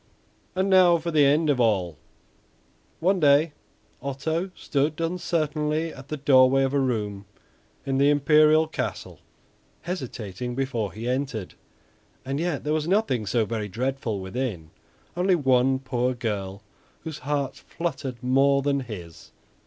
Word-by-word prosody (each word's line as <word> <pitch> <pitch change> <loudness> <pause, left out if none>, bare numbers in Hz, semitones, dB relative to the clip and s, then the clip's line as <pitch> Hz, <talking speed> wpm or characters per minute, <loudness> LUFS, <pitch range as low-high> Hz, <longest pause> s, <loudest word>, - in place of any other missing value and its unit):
And 190 +1 +1
now 185 -3 +6
for 170 +1 -4
the 150 -2 +4
end 155 +3 +3
of 145 -4 +2
all. 95 -8 +1 1.1
One 190 +3 +2
day 145 +1 +4 0.5
Otto 160 +7 -2
stood 145 +2 -1
uncertainly 160 -2 -1
at 135 +1 -12
the 150 - -4
doorway 135 -1 +5
of 135 0 0
a 140 - +2
room 105 -6 -2 0.6
in 135 -1 0
the 140 +1 +5
imperial 155 +2 +5
castle, 160 - -5 0.6
hesitating 125 - -5
before 120 -6 -2
he 115 +3 -6
entered; 125 -6 -2 0.7
and 135 +2 -2
yet 170 -4 -2
there 150 +1 0
was 155 0 -1
nothing 175 - +1
so 110 +3 +1
very 110 -1 -3
dreadful 120 0 -2
within, 95 -5 -4 0.4
only 180 +1 +3
one 130 -3 +3
poor 130 -1 -1
girl 100 -4 -4 0.4
whose 160 -2 -7
heart 140 -1 -2
fluttered 135 -8 -5
more 135 +2 +3
than 140 0 +1
his. 95 - -9
135 Hz, 135 wpm, -25 LUFS, 120-155 Hz, 1.1 s, now